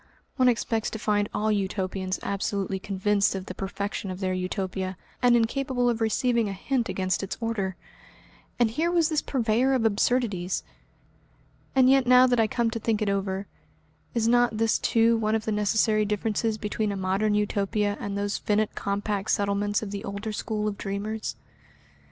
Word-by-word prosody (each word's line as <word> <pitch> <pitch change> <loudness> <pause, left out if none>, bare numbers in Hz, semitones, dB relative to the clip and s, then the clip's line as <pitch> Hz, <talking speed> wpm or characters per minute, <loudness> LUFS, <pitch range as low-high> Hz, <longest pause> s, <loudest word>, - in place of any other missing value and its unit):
One 255 -2 +5
expects 225 -2 0
to - - -5
find 205 -1 0
all 215 +1 0
Utopians 190 -2 -2
absolutely 195 -1 -2
convinced 200 +1 +1
of 190 -1 -4
the 185 - -6
perfection 195 +1 -4
of 185 0 -5
their 185 -1 -1
Utopia, 185 0 -3 0.2
and 245 -1 +5
incapable 245 +1 +1
of 230 -1 -4
receiving 230 0 +1
a - - -3
hint 240 +5 -1
against 185 0 -1
its 195 - -4
order. 210 -5 -2 0.8
And 235 -2 +3
here 320 +8 0
was 340 -3 +2
this 310 -2 +1
purveyor 250 +1 +1
of 250 -4 +1
absurdities! 210 -4 +1 1.1
And 260 -1 +6
yet 265 -1 +4
now 250 0 +7
that 245 -2 +2
I 225 - +4
come 235 +1 0
to 230 - -3
think 220 -1 0
it 205 - 0
over, 195 0 -1 0.7
is 225 -1 +2
not 240 -2 +3
this 225 0 +2
too 230 0 +3
one 215 0 +1
of 220 0 -2
the 220 - -1
necessary 215 +1 +2
differences 215 +1 -1
between 210 0 -2
a 200 - -3
Modern 195 +3 +1
Utopia 205 0 0
and 200 0 -4
those 205 0 -1
finite 210 0 0
compact 200 0 -2
settlements 205 +1 +1
of 200 - -5
the 200 -1 -5
older 200 +2 -4
school 210 0 -2
of 205 -1 -4
dreamers? 210 +2 -3
210 Hz, 175 wpm, -26 LUFS, 200-230 Hz, 1.1 s, now